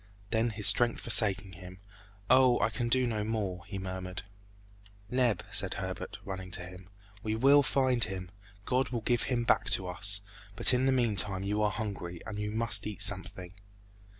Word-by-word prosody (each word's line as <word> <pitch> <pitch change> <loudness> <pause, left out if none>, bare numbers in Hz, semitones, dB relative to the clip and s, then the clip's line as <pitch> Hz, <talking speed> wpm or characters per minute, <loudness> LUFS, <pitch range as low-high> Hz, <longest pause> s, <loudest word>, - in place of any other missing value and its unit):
Then 115 +1 0
his 105 -2 -4
strength 120 -1 +6
forsaking 100 -4 +4
him, 90 +1 -13 0.5
"Oh! 130 0 +4
I 110 - 0
can 120 +2 -3
do 130 +1 +2
no 110 -3 -3
more!" 100 -5 -4
he 100 - -7
murmured. 95 -1 -7 0.9
"Neb," 125 -6 0
said - - +1
Herbert, - - -6
running 95 -1 -7
to 90 - -9
him, 90 0 -13 0.3
"we 110 +1 -3
will 140 +5 +4
find 130 -3 0
him! 95 -3 -6 0.3
God 130 +1 -1
will 120 -2 -4
give 120 +1 -1
him 120 -2 -1
back - - +1
to 95 - +2
us! 100 +2 -1 0.3
But 105 - +7
in 125 +1 +1
the - - +2
meantime 105 -6 +1
you 105 +2 -2
are 105 - +1
hungry, 100 -5 -6
and 105 -1 -7
you 105 0 -4
must 110 0 0
eat 105 - -1
something." 95 -2 -1
105 Hz, 180 wpm, -29 LUFS, 95-120 Hz, 0.9 s, But